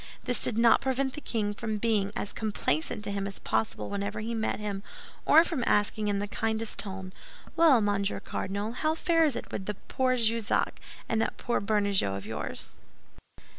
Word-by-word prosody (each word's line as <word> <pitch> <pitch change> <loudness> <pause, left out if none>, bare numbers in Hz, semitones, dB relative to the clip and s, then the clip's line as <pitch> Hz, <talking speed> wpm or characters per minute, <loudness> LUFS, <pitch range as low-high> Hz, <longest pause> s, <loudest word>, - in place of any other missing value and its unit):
This 250 -1 +2
did 225 - +4
not 230 -1 +5
prevent 265 0 0
the 300 - -7
king 210 -6 -1
from 215 0 -3
being 210 -2 +1
as 200 - -4
complacent 210 -4 -1
to 205 - -3
him 200 0 -2
as 195 - -7
possible 110 -1 -1
whenever 200 - -3
he 225 +2 -3
met 220 -1 -1
him, 205 -2 -3 0.5
or 320 +2 +8
from 320 -7 -2
asking 210 +1 +2
in 205 -1 +1
the 205 +1 -2
kindest 220 +1 -1
tone, 190 -2 -4 0.4
"Well, 320 -8 +6
Monsieur 200 -1 0
Cardinal, 200 +3 -3
how 310 +6 0
fares 330 -5 +3
it - - -5
with 190 - -4
that 210 -2 -6
poor 255 -1 +2
Jussac 230 -2 +1 0.3
and 220 -1 +1
that - - -1
poor 240 - -1
Bernajoux 200 - +1
of 100 - -8
yours?" - - -5
215 Hz, 180 wpm, -29 LUFS, 200-235 Hz, 0.5 s, or